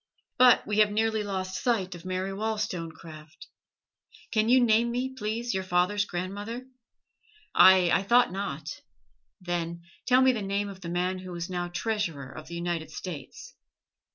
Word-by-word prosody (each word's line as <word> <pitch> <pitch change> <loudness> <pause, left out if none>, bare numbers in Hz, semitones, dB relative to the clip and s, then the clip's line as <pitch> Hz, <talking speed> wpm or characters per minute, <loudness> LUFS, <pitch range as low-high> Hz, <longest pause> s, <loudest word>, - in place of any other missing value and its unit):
But 250 -1 +6
we 210 0 0
have 210 -1 +6
nearly 220 +1 0
lost 185 -2 -4
sight 200 -7 0
of 175 0 -11
Mary 185 +1 -2
Wollstonecraft. 165 -7 -5 0.9
Can 220 0 +2
you 255 +1 +6
name 235 -1 +3
me, 255 +2 -2
please, 230 0 -3
your 190 0 -1
father's 185 +3 +1
grandmother? 205 +7 -5 0.9
Aye, 185 -2 +7
I - - +4
thought 240 +3 +4
not; 180 -6 -4 0.7
then 170 -2 -3 0.2
tell 255 0 +5
me 260 - +6
the 235 -4 -3
name 200 +1 -2
of 190 -1 -10
the 170 - -6
man 180 +2 -1
who 185 -1 -8
is 170 +1 -5
now 175 -1 -2
Treasurer 175 - -3
of 155 - -10
the 170 - -7
United 170 -2 -3
States! 180 - -8
190 Hz, 155 wpm, -28 LUFS, 175-220 Hz, 0.9 s, Aye